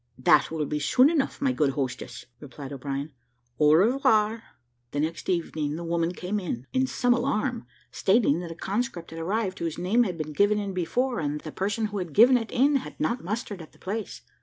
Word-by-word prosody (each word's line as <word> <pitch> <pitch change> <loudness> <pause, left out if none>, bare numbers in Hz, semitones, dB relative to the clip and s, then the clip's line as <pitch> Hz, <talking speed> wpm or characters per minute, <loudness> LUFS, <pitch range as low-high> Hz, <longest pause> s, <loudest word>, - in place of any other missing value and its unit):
"That 130 - +4
will 160 -2 -2
be 150 +1 -2
soon 255 - +4
enough, 295 -5 0
my 270 - +3
good 150 - +1
hostess," 130 -2 -4
replied 140 0 -9
O'Brien: 140 +2 -4 0.5
"au 150 0 +6
revoir." 220 +1 +3 0.5
The 145 - -1
next 160 +3 -2
evening, 160 -4 -1
the 170 - -5
woman 170 0 0
came 180 +3 -3
in, 130 -10 -4
in 260 0 +2
some 245 -1 +2
alarm, 245 -1 -1 0.2
stating 195 -6 +2
that 175 -1 -6
a 165 - -7
conscript 190 -2 -3
had 165 - -7
arrived 195 +3 -2
whose 165 -2 -3
name 190 +7 +2
had 185 -8 0
been 155 -1 -5
given 205 +6 +3
in 200 -2 -3
before, 240 +8 -1
and 145 -2 -1
that - - -20
the 155 - -6
person 205 +6 -1
who 210 -1 -3
had 175 -5 -5
given 245 - +7
it 225 -3 0
in 275 +3 +3
had 265 - -8
not 240 - -1
mustered 205 0 -4
at 155 - -13
the - - -21
place. 210 +2 -5
185 Hz, 210 wpm, -26 LUFS, 155-230 Hz, 0.5 s, given